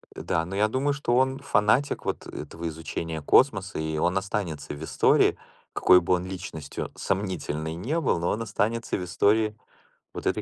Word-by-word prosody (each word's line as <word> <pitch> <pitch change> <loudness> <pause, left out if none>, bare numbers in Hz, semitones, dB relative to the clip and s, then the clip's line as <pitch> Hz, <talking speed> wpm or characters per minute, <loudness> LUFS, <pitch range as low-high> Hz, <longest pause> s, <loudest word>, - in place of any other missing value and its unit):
Да, 80 0 -1
но 95 +3 -6
я 105 +2 +3
думаю, 135 +5 0
что 130 -4 0
он 130 +1 +2
фанатик 130 +1 +1
вот - - -3
этого 80 +3 -6
изучения 80 0 -5
космоса, 100 - +3
и 80 0 -2
он 90 +4 +1
останется 95 -8 -3
в 75 - -8
истории. - - +3 0.4
Какой 90 0 +6
бы 85 - +1
он 90 0 0
личностью 90 -6 -6
сомнительной 90 -5 -2
не 125 - -2
был, 130 - +1
но 85 - 0
он 115 +2 -1
останется 115 +2 -1
в 90 - -4
истории 105 +4 +2 0.6
вот - - -6
этой - - +1
95 Hz, 175 wpm, -26 LUFS, 80-110 Hz, 0.6 s, Какой